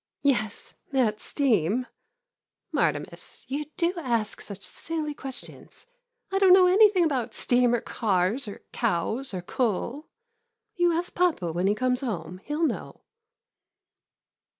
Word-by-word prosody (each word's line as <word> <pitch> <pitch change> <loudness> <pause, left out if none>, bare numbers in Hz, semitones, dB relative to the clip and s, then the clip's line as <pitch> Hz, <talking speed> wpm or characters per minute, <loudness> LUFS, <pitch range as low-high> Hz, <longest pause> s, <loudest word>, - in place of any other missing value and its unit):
Yes, 225 -7 0 0.2
that's 235 -6 +1
steam 240 - +1 0.5
— - - -53
Martimas, - - -2
you 290 +3 -3
do 340 +1 +2
ask 235 -8 -1
such 200 -1 -9
silly 315 -2 -3
questions! 265 -3 -10 0.5
I 390 - +1
don't 380 -2 +7
know 370 -1 +8
anything 385 0 +6
about 250 -7 -1
steam 245 -1 +3
or 235 - -1
cars 210 +3 0
or 205 - -8
cows 230 +4 -1
or 185 -3 -5
coal! 250 - -2 0.7
You 350 -1 +3
ask 340 +2 -2
papa 320 - +1
when 175 +3 0
he 205 - +3
comes 255 +2 0
home. 190 -7 -4
He - - -9
'11 320 +2 +2
know. - - -7
255 Hz, 135 wpm, -26 LUFS, 210-315 Hz, 0.7 s, know